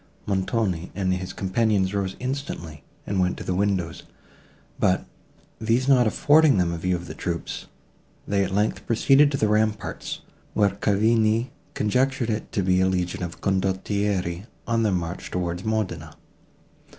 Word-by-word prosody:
Montoni 95 Hz, -3 st, -1 dB
and 95 Hz, -2 st, +1 dB
his 90 Hz, 0 st, -4 dB
companions 100 Hz, -1 st, +1 dB
rose 95 Hz, -2 st, -1 dB
instantly 125 Hz, -, -5 dB, 0.2 s
and 100 Hz, -1 st, -1 dB
went 90 Hz, 0 st, +1 dB
to -, -, -6 dB
the 95 Hz, -, -1 dB
windows, 95 Hz, -3 st, 0 dB, 0.8 s
but, -, -, +2 dB, 0.5 s
these 115 Hz, +4 st, +1 dB
not 125 Hz, -4 st, +5 dB
affording 145 Hz, +2 st, +5 dB
them 85 Hz, -2 st, +1 dB
a 85 Hz, -, -4 dB
view 90 Hz, +2 st, 0 dB
of 85 Hz, 0 st, -5 dB
the -, -, -7 dB
troops, 85 Hz, -1 st, -4 dB, 0.6 s
they 100 Hz, -1 st, +2 dB
at 95 Hz, -, -3 dB
length 105 Hz, +3 st, 0 dB
proceeded 135 Hz, +5 st, +5 dB
to 135 Hz, -, 0 dB
the 110 Hz, -, +2 dB
ramparts, 105 Hz, -5 st, -1 dB, 0.3 s
where 100 Hz, -2 st, +4 dB
Cavigni 110 Hz, +4 st, +2 dB, 0.2 s
conjectured 125 Hz, +2 st, +1 dB
it 105 Hz, 0 st, -4 dB
to 100 Hz, -, 0 dB
be 90 Hz, 0 st, +3 dB
a 95 Hz, -, +4 dB
legion 90 Hz, -1 st, -1 dB
of 85 Hz, -1 st, -5 dB
condottieri, 95 Hz, 0 st, -1 dB, 0.2 s
on 115 Hz, -1 st, +1 dB
their 110 Hz, -2 st, +2 dB
march 85 Hz, -2 st, -3 dB
towards 90 Hz, 0 st, -2 dB
Modena. 90 Hz, -8 st, -2 dB
100 Hz, 150 wpm, -24 LUFS, 90-110 Hz, 0.8 s, not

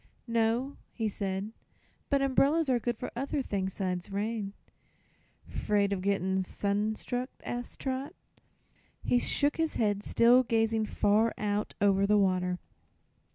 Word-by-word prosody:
"No," 230 Hz, +3 st, 0 dB, 0.2 s
he 225 Hz, -2 st, -1 dB
said; 195 Hz, 0 st, -3 dB, 0.6 s
"but 280 Hz, -1 st, +2 dB
umbrellas 280 Hz, +3 st, +3 dB
are 250 Hz, -2 st, +3 dB
good 240 Hz, +1 st, -2 dB
for 250 Hz, -, -5 dB
other 275 Hz, +2 st, -2 dB
things 190 Hz, -4 st, -2 dB
'sides 185 Hz, -1 st, -3 dB
rain." 205 Hz, 0 st, -2 dB, 0.9 s
"'Fraid 200 Hz, -1 st, +1 dB
of 190 Hz, -, -2 dB
gett'n' 190 Hz, -1 st, +1 dB
sun 205 Hz, +3 st, -1 dB
struck?" 250 Hz, +3 st, -3 dB
asked 245 Hz, 0 st, -5 dB
Trot. 265 Hz, +1 st, -3 dB, 0.9 s
He 245 Hz, -, +3 dB
shook 285 Hz, +4 st, +1 dB
his 325 Hz, -1 st, 0 dB
head, 205 Hz, -3 st, +1 dB
still 235 Hz, +4 st, +5 dB
gazing 225 Hz, -2 st, +1 dB
far 215 Hz, +3 st, +2 dB
out 210 Hz, 0 st, -2 dB
over 200 Hz, -1 st, +3 dB
the 210 Hz, 0 st, +4 dB
water. 185 Hz, -2 st, +1 dB
215 Hz, 135 wpm, -30 LUFS, 200-245 Hz, 0.9 s, still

